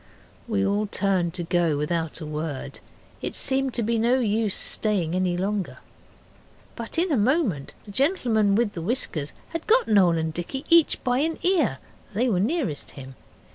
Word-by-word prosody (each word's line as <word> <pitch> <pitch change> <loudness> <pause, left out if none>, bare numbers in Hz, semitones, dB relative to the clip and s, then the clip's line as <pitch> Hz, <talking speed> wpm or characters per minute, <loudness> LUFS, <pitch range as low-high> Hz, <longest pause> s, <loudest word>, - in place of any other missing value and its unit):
We 205 -4 0
all 205 +2 0
turned 185 -4 0
to 175 - -3
go 170 -3 +1
without 160 +2 -2
a - - -5
word, 150 -2 -5 0.4
it - - -3
seemed 270 -1 +2
to 235 - 0
be 230 +1 0
no 240 +3 +2
use 215 -3 0
staying 190 -7 +2
any 180 -1 0
longer. 195 +1 -2 1.0
But 230 +5 -6
in 345 +1 +1
a - - +3
moment 220 - 0
the 205 - -10
gentleman 230 - +1
with 225 -1 +1
the 170 - -5
whiskers 165 - -2 0.2
had 330 -1 -6
got 475 +3 +4
Noel 185 -6 +4
and 160 0 -2
Dicky 265 - -5
each 335 -2 +4
by 250 0 +1
an 320 +3 -1
ear 325 - +2 0.4
they 245 +5 +1
were 190 -5 +1
nearest 230 - -1
him. 135 -1 -9
205 Hz, 175 wpm, -24 LUFS, 170-255 Hz, 1.0 s, got